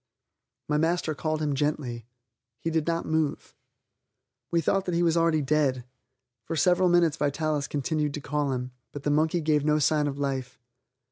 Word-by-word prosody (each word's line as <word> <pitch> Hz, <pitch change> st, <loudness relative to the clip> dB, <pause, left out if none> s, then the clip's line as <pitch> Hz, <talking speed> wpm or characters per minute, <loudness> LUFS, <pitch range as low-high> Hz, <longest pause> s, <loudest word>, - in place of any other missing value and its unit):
My 150 Hz, 0 st, +1 dB
master 165 Hz, 0 st, +1 dB
called 155 Hz, +1 st, -2 dB
him 145 Hz, -1 st, 0 dB
gently. 135 Hz, -5 st, -2 dB, 0.5 s
He 165 Hz, -, -2 dB
did 160 Hz, -1 st, 0 dB
not 165 Hz, 0 st, 0 dB
move. 160 Hz, -2 st, -1 dB, 1.0 s
We 170 Hz, -, +2 dB
thought 190 Hz, +4 st, +1 dB
that 180 Hz, -, -1 dB
he 175 Hz, -, +2 dB
was 165 Hz, -1 st, +3 dB
already 165 Hz, -2 st, +2 dB
dead. 135 Hz, -3 st, +1 dB, 0.6 s
For 165 Hz, -, -4 dB
several 180 Hz, +3 st, +3 dB
minutes 170 Hz, -3 st, +3 dB
Vitalis 150 Hz, 0 st, -1 dB
continued 150 Hz, +1 st, -1 dB
to -, -, -4 dB
call 145 Hz, 0 st, -1 dB
him, 125 Hz, 0 st, -3 dB, 0.2 s
but 145 Hz, -, -7 dB
the 145 Hz, -, +1 dB
monkey 160 Hz, +3 st, +2 dB
gave 150 Hz, -2 st, +2 dB
no 150 Hz, 0 st, +3 dB
sign 150 Hz, 0 st, +2 dB
of 140 Hz, -1 st, -4 dB
life. 135 Hz, -3 st, -3 dB
150 Hz, 175 wpm, -27 LUFS, 145-165 Hz, 1.0 s, was